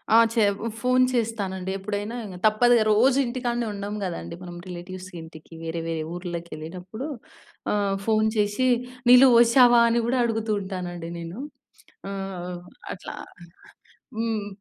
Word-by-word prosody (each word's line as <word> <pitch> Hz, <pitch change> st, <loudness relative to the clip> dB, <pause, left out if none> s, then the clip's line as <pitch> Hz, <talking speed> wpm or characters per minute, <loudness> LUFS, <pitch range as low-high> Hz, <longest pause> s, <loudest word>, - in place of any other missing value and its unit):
ఆ! -, -, +9 dB, 0.2 s
చె 230 Hz, -2 st, +3 dB, 0.4 s
ఫోన్ 255 Hz, +1 st, +4 dB
చేస్తానండి. 200 Hz, -6 st, -2 dB
ఎప్పుడైనా 205 Hz, +3 st, -4 dB
ఇంగ 190 Hz, -3 st, -8 dB
తప్పదు‌గా 230 Hz, +2 st, +5 dB
రోజు 250 Hz, +5 st, +4 dB
ఇంటికాడనే 240 Hz, -1 st, -2 dB
ఉండం 200 Hz, +1 st, -5 dB
గదండీ! 175 Hz, -2 st, -4 dB
మనం 175 Hz, -1 st, -8 dB
రిలేటివ్స్ 185 Hz, +1 st, -8 dB
ఇంటికి 160 Hz, 0 st, -13 dB
వేరే 165 Hz, +1 st, -3 dB
వేరే 165 Hz, -1 st, -2 dB
ఊర్లకి 175 Hz, -1 st, -6 dB
ఎళ్ళిటప్పుడు 180 Hz, -, -7 dB, 0.6 s
ఆహ్, 200 Hz, -1 st, +1 dB
ఫోన్ 220 Hz, -1 st, +3 dB
చేశి 210 Hz, +5 st, +1 dB, 0.4 s
"నీల్లు 250 Hz, +2 st, +9 dB
ఫోశావా?" 240 Hz, 0 st, +7 dB
అని 235 Hz, +1 st, +2 dB
గూడా 250 Hz, +2 st, +1 dB
అడుగుతూ 225 Hz, -1 st, -1 dB
ఉంటానండి 180 Hz, -3 st, -5 dB
నేను. 170 Hz, +6 st, -7 dB, 0.7 s
ఆహ్, 180 Hz, -2 st, -5 dB, 0.3 s
అట్లా -, -, -8 dB, 1.0 s
హ్మ్. 225 Hz, -3 st, -1 dB
205 Hz, 125 wpm, -25 LUFS, 180-235 Hz, 1.0 s, ఆ